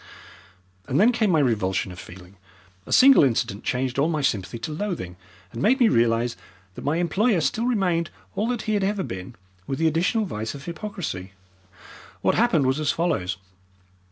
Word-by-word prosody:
And 135 - +1
then 225 +5 +6
came 220 -3 +1
my 165 -4 +3
revulsion 95 -7 0
of 90 - -10
feeling. 90 +2 -13 0.5
A - - -9
single 270 - +7
incident 115 -5 0
changed 130 +1 -1
all 150 +4 +2
my 155 -3 -1
sympathy 110 -3 -1
to 115 - -5
loathing, 155 - -4 0.4
and 115 - -6
made 255 - +3
me 240 -3 +5
realize 115 0 +2 0.4
that - - -9
my 145 +3 0
employer 190 +5 +2
still 225 +9 0
remained 180 -8 +1 0.3
all 210 +4 0
that 245 -2 -2
he 215 - -1
had 205 -2 +1
ever 200 0 0
been, 95 - -7 0.3
with 135 - -2
the 165 - 0
additional 170 +8 +1
vice 110 - -5
of 140 - -10
hypocrisy. 170 - -6 0.9
What - - +2
happened 195 - +2
was 130 +3 +1
as 150 -2 0
follows. 120 - -1
155 Hz, 180 wpm, -24 LUFS, -, 0.9 s, single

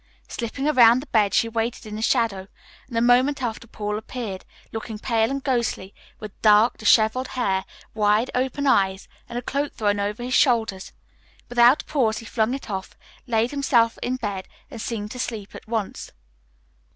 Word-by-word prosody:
Slipping 255 +4 -4
around 245 -4 +6
the - - -10
bed 210 -7 +2
she 230 - +3
waited 230 +1 -3
in 210 -1 -7
the 215 - -5
shadow, 225 -6 +1 0.4
and 240 -3 -5
a - - +3
moment 250 +4 +4
after 230 -1 -4
Paul 210 -1 -4
appeared, 220 -4 -6 0.3
looking 225 -1 -6
pale 225 0 +1
and 275 0 -3
ghostly, 235 -7 -1 0.3
with 215 -2 -10
dark, 215 +2 +5
disheveled 220 +4 +3
hair, 200 -8 -1 0.3
wide 215 +2 +2
open 265 +3 -1
eyes, 195 -7 +2 0.2
and 240 - -5
a 245 - -4
cloak 280 +3 -2
thrown 205 -1 0
over 205 +3 -3
his 250 +1 -3
shoulders. 225 -9 +2 0.6
Without 245 +4 +5
a - - -32
pause 235 -7 +1
he 230 - -8
flung 225 +2 0
it 275 - -8
off, 190 -3 -6 0.3
laid 230 0 +1
himself 250 -5 +2
in 250 - -1
bed, 205 -6 -4 0.2
and 225 - -7
seemed 210 -3 -4
to 250 - -7
sleep 215 -5 -5
at - - -11
once. 220 -3 -4
230 Hz, 175 wpm, -23 LUFS, 210-250 Hz, 0.6 s, around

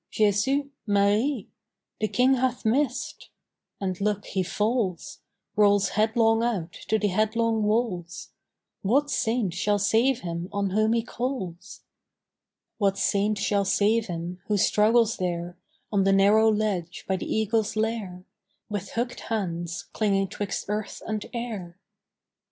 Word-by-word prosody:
"Jesu! 240 +7 +1 0.2
Marie! 205 +4 +2 0.5
"The 215 - +1
King 250 +4 +3
hath 255 -2 0
missed!" 265 +6 -1 0.5
And, 190 -1 -3
look, 205 0 0
he 190 - -1
falls! 205 -1 -1 0.4
Rolls 205 -1 +4
headlong 225 +1 +2
out 200 -8 -1
to 220 - +2
the 210 -1 0
headlong 220 +3 +1
walls. 210 -5 -1 0.5
What 280 +8 +2
Saint 225 -7 0
shall 205 +3 +1
save 230 +6 +2
him 170 +1 -4
on 200 -1 -1
whom 215 +3 +2
he 230 -1 +1
calls? 220 -7 -5 1.0
What 195 -2 +2
Saint 205 +1 +1
shall 200 0 +1
save 210 +4 +2
him, 175 +1 -5
who 210 - +1
struggles 225 +3 +3
there 175 -1 -3 0.4
On 200 -2 +2
the 195 0 +3
narrow 210 +3 +5
ledge 200 -5 -2
by 190 - +1
the - - -5
eagle's 220 0 0
lair, 215 -5 -2 0.4
With 205 -3 -5
hook'd 245 +1 -2
hands 175 -6 -2
clinging 195 -3 +1
'twixt 205 -1 -4
earth 210 0 -4
and 215 -1 -3
air? 215 -8 -5
210 Hz, 135 wpm, -26 LUFS, 190-225 Hz, 1.0 s, narrow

